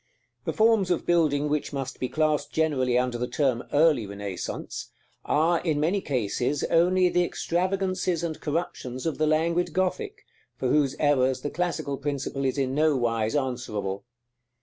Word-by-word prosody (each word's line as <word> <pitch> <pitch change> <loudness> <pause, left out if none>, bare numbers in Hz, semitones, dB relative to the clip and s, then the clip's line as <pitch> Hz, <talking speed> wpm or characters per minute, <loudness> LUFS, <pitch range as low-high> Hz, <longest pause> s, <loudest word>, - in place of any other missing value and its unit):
The - - 0
forms 220 -4 +3
of 175 - 0
building 150 -4 +2
which 150 0 -1
must 135 -2 -5
be 130 - -2
classed 155 -1 0
generally 135 -6 +1
under 125 -1 0
the 125 - -1
term 125 -2 0
early 145 -7 +3
Renaissance 100 -2 -5 0.4
are, 165 +3 +2
in 155 -4 0
many 175 +6 +1
cases, 130 - -1
only 180 +2 +4
the 180 0 +2
extravagances 185 0 -1
and 160 -2 -4
corruptions 145 -5 -3
of 160 -2 -2
the 155 - +2
languid 165 +2 +1
Gothic, 185 +1 -2 0.3
for 130 - -1
whose 145 -1 +2
errors 135 -3 +2
the 145 - -3
classical 155 -5 -2
principle 140 -1 -3
is 130 +1 0
in 135 -1 0
no 150 0 +3
wise 115 -1 0
answerable. 120 -8 -2
150 Hz, 155 wpm, -26 LUFS, 130-170 Hz, 0.4 s, only